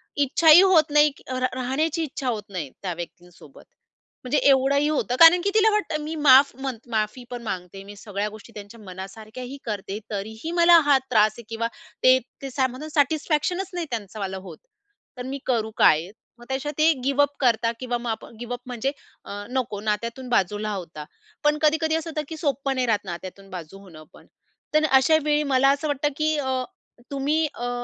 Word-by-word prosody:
इच्छाही 305 +4 +6
होत 335 -6 +4
नाही, 300 0 +5
क - - -18
र 255 0 -2
राहण्याची 285 +6 -1
इच्छा 275 -3 -5
होत 215 -3 -3
नाही, 175 -8 -5
त्या 185 -3 -3
व्यक्तींसोबत, 175 +1 -11 0.6
म्हणजे 255 +3 0
एवढंही 275 +2 +3
होतं. 275 -5 -1
कारण 335 +2 +8
की 400 - +1
तिला 440 0 +5
वाटतं, 335 -8 -1
मी 315 +2 -5
माफ 280 -3 +6
म्हणत 260 -3 -6
माफी 220 +2 -2
पण 245 -1 -6
मागते, 190 -2 -6
मी 205 +1 -11
सगळ्या 205 0 -4
गोष्टी 215 +2 -14
त्यांच्या 210 +2 -11
मनासारख्याही 215 +7 -9
करते, 205 -2 -4
तरीही 220 +8 -5
मला 340 0 +8
हा 285 -2 +5
त्रास 215 -3 +4
आहे 235 - -10
किंवा 230 0 -2 0.4
ते 255 0 +7 0.2
ते 275 - -5
सॅ 260 0 +1
म्हणतो 260 +5 -8
सॅटिस्फॅक्शनच 315 +5 0
नाही 350 -1 -3
त्यांचं 215 -3 -6
मला 190 -1 -4
होत. 190 0 -10 0.6
तर 250 - -5
मी 270 +2 -5
करू 225 -4 0
काय? 160 +3 +4 0.3
मग 240 - -13
त्याच्या 270 +2 -2
ते 315 +1 +5
गिव 275 +2 +2
अप 285 0 +1
करतात 230 -3 +2
किंवा 245 -1 -2
मग 240 0 -5
आप 220 - -4
गिव 240 0 -5
अप 245 - -5
म्हणजे 250 +2 -2 0.3
अ, 205 0 -7
नको, 250 -5 -2
नात्यातून 230 +4 -3
बाजूला 210 -1 0
होता. 165 -6 -7 0.4
पण 295 0 +3
कधी-कधी 315 +1 +2
असं 325 0 -3
होतं, 310 -1 -3
की 320 - -6
सोपं 275 -3 -1
नाही 255 -1 0
राहत 210 -3 0
नात्यातून 190 +2 -8
बाजू 180 0 -9
होणं 170 -6 -14
पण. - - -17 0.5
तर 305 0 +4
अशा 265 +4 +5
वेळी, 300 0 +2
मला 275 -1 +3
असं 285 +2 -1
वाटतं, 290 0 0
की 310 0 +1
अ, 260 -2 -1 0.5
तुम्ही 290 +3 0
अ, 245 +1 -4
255 Hz, 190 wpm, -24 LUFS, 210-295 Hz, 0.6 s, कारण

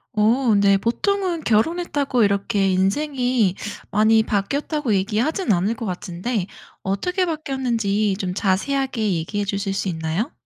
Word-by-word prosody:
어 225 +3 +3
네. 200 -1 +4
보통은 345 - -1
결혼했다고 280 +2 +1
이렇게 200 0 +1
인생이 245 +2 +1 0.3
많이 220 +2 +4
바뀌었다고 255 +6 -1
얘기하진 225 - 0
않을 195 +4 +2
것 225 -1 -5
같은데 180 +3 -3 0.4
어떻게 360 - 0
바뀌었는지 235 - -1
좀 185 -2 -3
자세하게 225 +3 0
얘기해 185 +6 -2
주실 195 0 -2
수 195 0 -2
있나요? 165 - -2
215 Hz, 315 characters per minute, -22 LUFS, 195-270 Hz, 0.4 s, 네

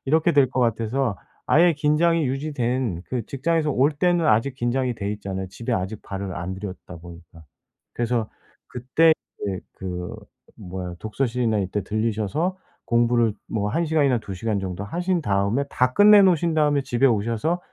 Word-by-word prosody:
이렇게 160 +4 +2
될 140 -4 +4
거 130 - -1
같아서 115 0 0 0.3
아예 170 +2 +5
긴장이 155 +2 +2
유지된 125 - -2
그 125 -3 -3
직장에서 155 +3 0
올 135 +4 +3
때는 175 +2 +1
아직 120 +2 +2
긴장이 125 0 -1
돼 100 -2 -4
있잖아요 95 -2 -5
집에 115 +5 -5
아직 95 +3 -3
발을 95 -1 -5
안 85 +2 -4
들였다 95 -2 -8
보니까. 85 -1 -14 0.5
그래서 120 -2 -1 0.4
그때 135 +7 +3 0.3
이제 95 -3 -3
그 90 -2 -6 0.4
뭐야 90 -1 -6
독서실이나 115 +1 -1
이때 100 +2 -2
들리셔서 110 - -1 0.3
공부를 120 -1 +2 0.2
뭐 105 -2 -1
1 165 +8 0
시간이나 145 -5 +2
2 100 -3 -7
시간 105 +2 -2
정도 95 0 -5
하신 175 - -1
다음에 100 +6 +1
다 125 0 +1
끝내 205 0 +8
놓으신 170 -3 +3
다음에 150 -2 +2
집에 130 0 +2
오셔서 115 +9 0
120 Hz, 335 characters per minute, -23 LUFS, 100-150 Hz, 0.5 s, 끝내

